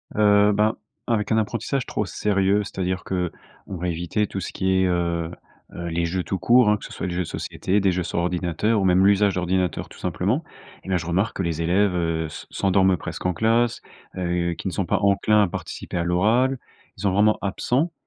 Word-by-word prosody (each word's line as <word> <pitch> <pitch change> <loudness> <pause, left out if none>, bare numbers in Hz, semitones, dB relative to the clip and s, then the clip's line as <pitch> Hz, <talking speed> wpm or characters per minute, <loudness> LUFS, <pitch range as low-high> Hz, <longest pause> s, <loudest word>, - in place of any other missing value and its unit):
Heu, 105 0 +5
ben, 105 +2 +2 0.3
avec 110 -3 0
un 110 - +3
apprentissage 120 +4 -1
trop 105 - -2
sérieux, 100 +1 +1
c'est-à-dire 95 -1 -3
qu'on 90 -2 -1 0.5
va 90 +2 -3
éviter 85 +5 -1
tout 95 - -5
ce - - -5
qui 95 0 +1
est, - - +3
heu, 85 -2 -1 0.4
heu, 85 - -5
les 85 0 -1
jeux, 90 +2 -2
tout 95 - -2
court, 120 +5 +5
hein, 105 - +4
que - - -15
ce - - -10
soit - - -4
les 90 - -3
jeux 90 - -2
de 90 - -4
société, 100 +3 -1
des 100 -1 +2
jeux 90 0 -1
sur 85 - -2
ordinateur 90 +5 0
ou - - 0
même 95 +1 +4
l'usage 100 0 +4
d'ordinateur, 90 -1 -1
tout - - -14
simplement. - - -1 0.4
Et - - -9
bah, 95 - +2
je 80 - -5
remarque 95 +6 0
que 95 - -1
les 85 -2 -2
élèves 85 -2 +1
se - - -9
s'endorment 95 -1 +2
presque - - -7
en 90 - +2
classe, 115 +5 +1 0.4
heu, 85 -1 -1
qu'ils 95 - -4
ne - - -7
sont 95 - -1
pas - - +1
enclins 100 +1 +3
à - - +2
participer 85 - -6
à 85 - 0
l'oral. 110 +10 +2 0.4
Ils - - -9
sont 100 -2 +1
vraiment 105 +2 +4
absents, 130 - 0
95 Hz, 215 wpm, -23 LUFS, 90-105 Hz, 0.5 s, Heu